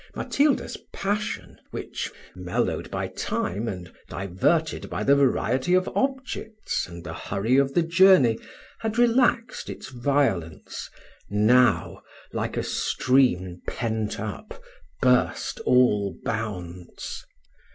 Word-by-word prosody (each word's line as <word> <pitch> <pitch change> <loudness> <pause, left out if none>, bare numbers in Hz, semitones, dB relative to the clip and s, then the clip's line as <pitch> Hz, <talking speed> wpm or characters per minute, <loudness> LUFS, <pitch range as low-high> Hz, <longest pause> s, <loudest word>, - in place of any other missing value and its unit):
Matilda's 285 0 +1
passion, 205 +2 -3
which, - - -5 0.2
mellowed 90 -1 -2
by - - -2
time, 105 +6 -2
and 90 -5 -6 0.2
diverted 100 - 0
by - - -3
the 140 - +5
variety 135 +3 +2
of 185 0 +2
objects, 260 -5 -2
and 85 -1 -10
the - - -6
hurry 110 +6 0
of 135 0 +2
the 175 - +4
journey, 170 -8 +5 0.4
had 225 0 -3
relaxed 240 0 +2
its - - -7
violence, 120 - -1 0.4
now, 120 +5 +3 0.3
like - - -2
a - - 0
stream 95 -10 +1
pent 110 -2 -2
up, 105 -1 -6 0.4
burst 125 -1 +2
all 105 -6 +3
bounds. 90 -6 -5
125 Hz, 110 wpm, -25 LUFS, -, 0.4 s, the